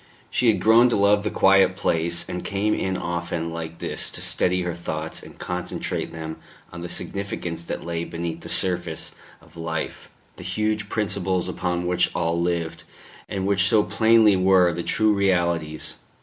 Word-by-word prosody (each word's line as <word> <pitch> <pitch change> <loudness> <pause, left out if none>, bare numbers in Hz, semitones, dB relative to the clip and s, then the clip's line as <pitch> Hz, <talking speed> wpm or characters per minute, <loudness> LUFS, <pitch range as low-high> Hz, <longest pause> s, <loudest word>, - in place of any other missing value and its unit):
She 125 - +2
had 110 - +4
grown 115 +3 +6
to - - +1
love 100 +1 +4
the 105 - -1
quiet 95 -2 +4
place, 85 -2 0
and 90 -1 -4
came 105 +2 0
in 95 -1 -1
often 85 -1 -3
like 85 0 -6
this - - -2
to - - -5
steady 90 0 +2
her 90 -1 -2
thoughts 80 -2 -4
and - - -13
concentrate - - -3
them 80 -1 -6 0.4
on 85 - -7
the 85 - -5
significance 90 -5 -4
that - - -5
lay 85 -1 -2
beneath 85 -1 -5
the - - -8
surface 90 -4 -2 0.3
of - - -20
life 80 -1 -4 0.3
the - - -9
huge 105 +3 -1
principles 95 -4 0
upon 90 -1 -2
which 90 0 +2
all 85 +1 0
lived, 85 -2 -2 0.5
and 95 -1 -2
which 100 -1 +3
so 105 0 +4
plainly 110 -2 +5
were 95 -2 +4
the 85 - -3
true 110 +5 +2
realities. 85 -5 0
90 Hz, 170 wpm, -24 LUFS, 85-100 Hz, 0.5 s, grown